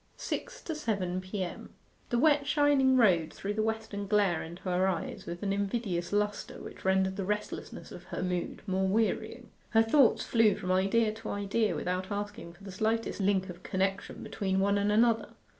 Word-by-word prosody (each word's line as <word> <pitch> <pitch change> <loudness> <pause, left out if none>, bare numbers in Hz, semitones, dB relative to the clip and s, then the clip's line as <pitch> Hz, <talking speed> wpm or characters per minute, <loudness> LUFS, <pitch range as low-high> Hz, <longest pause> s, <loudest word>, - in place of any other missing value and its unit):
SIX - - -5
TO 325 - -3
SEVEN 195 - -2
P.M. 185 -1 -5 0.3
The 240 - +1
wet 285 +1 +4
shining 285 -3 +4
road 175 -9 +4
threw 200 +1 -4
the 215 - 0
western 220 -2 -3
glare 200 -5 +2
into 170 +2 -9
her 185 0 +1
eyes 185 -3 -3
with 175 +2 -6
an 195 -1 0
invidious 200 -3 -2
lustre 205 0 -1
which - - -10
rendered 190 0 +2
the 195 - -1
restlessness 210 +2 -4
of - - -10
her - - -4
mood 180 -1 -3
more 190 -1 0
wearying. 220 +3 -1 0.2
Her 225 -1 +5
thoughts 245 +2 +4
flew 225 -4 +3
from 185 -3 -3
idea 205 +4 +2
to 220 0 -8
idea 205 +2 0
without 185 +1 -2
asking 205 -4 -5
for 185 +3 -18
the 195 - -8
slightest 220 +4 -1
link 190 -1 +2
of 180 -2 -9
connection 195 +1 -2
between 190 -2 -1
one 200 +1 +2
and 205 +1 +1
another. 225 +1 +2
200 Hz, 180 wpm, -30 LUFS, 190-220 Hz, 0.3 s, Her